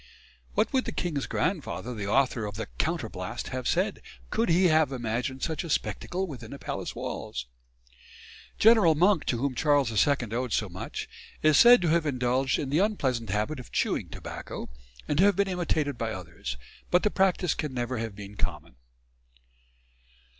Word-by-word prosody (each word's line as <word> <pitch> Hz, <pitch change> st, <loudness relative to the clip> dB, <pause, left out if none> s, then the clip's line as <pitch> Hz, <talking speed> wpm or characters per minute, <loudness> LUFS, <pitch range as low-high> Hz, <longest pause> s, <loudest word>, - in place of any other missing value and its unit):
What -, -, +1 dB
would 260 Hz, -1 st, +2 dB
the -, -, -3 dB
king's 155 Hz, -6 st, -2 dB
grandfather, 160 Hz, -8 st, -2 dB
the 105 Hz, -3 st, -4 dB
author 125 Hz, -1 st, +2 dB
of 105 Hz, -, -7 dB
the -, -, -3 dB
"Counterblaste," -, -, -3 dB
have 130 Hz, -1 st, -3 dB
said, 190 Hz, +3 st, 0 dB, 0.3 s
could 225 Hz, -2 st, +1 dB
he 175 Hz, +3 st, +4 dB
have 155 Hz, -4 st, +4 dB
imagined 125 Hz, +2 st, -3 dB
such 160 Hz, -2 st, -1 dB
a 170 Hz, -, -7 dB
spectacle 185 Hz, +4 st, -1 dB
within 125 Hz, -10 st, -8 dB
the 140 Hz, -, -7 dB
palace -, -, -5 dB
walls? 60 Hz, -, -5 dB, 1.1 s
General 215 Hz, -8 st, +6 dB
Monk, 180 Hz, +2 st, +3 dB
to 120 Hz, -, 0 dB
whom 135 Hz, +2 st, -1 dB
Charles 145 Hz, -3 st, +2 dB
II 140 Hz, +6 st, +4 dB, 0.2 s
owed 125 Hz, -1 st, -1 dB
so 105 Hz, -, 0 dB
much, 90 Hz, +2 st, -6 dB, 0.4 s
is 155 Hz, -1 st, +6 dB
said 240 Hz, -4 st, +8 dB
to 170 Hz, -, +2 dB
have 165 Hz, -1 st, +2 dB
indulged 130 Hz, 0 st, +1 dB
in 135 Hz, -2 st, -3 dB
the 150 Hz, -, +3 dB
unpleasant 130 Hz, -, 0 dB
habit 105 Hz, +9 st, -1 dB
of 125 Hz, -, -11 dB
chewing -, -, 0 dB
tobacco, -, -, -7 dB, 0.4 s
and 150 Hz, -, 0 dB
to -, -, +6 dB
have 200 Hz, -1 st, +5 dB
been 200 Hz, +1 st, +2 dB
imitated 160 Hz, -7 st, -1 dB
by 115 Hz, -1 st, -1 dB
others; 85 Hz, -7 st, -6 dB, 0.3 s
but 180 Hz, -, +3 dB
the 210 Hz, -, +2 dB
practice 190 Hz, -2 st, +2 dB
can 150 Hz, -, -3 dB
never 125 Hz, -1 st, -2 dB
have 110 Hz, -3 st, -4 dB
been 100 Hz, 0 st, -9 dB
common. 85 Hz, -6 st, -4 dB
140 Hz, 175 wpm, -28 LUFS, 115-175 Hz, 1.1 s, said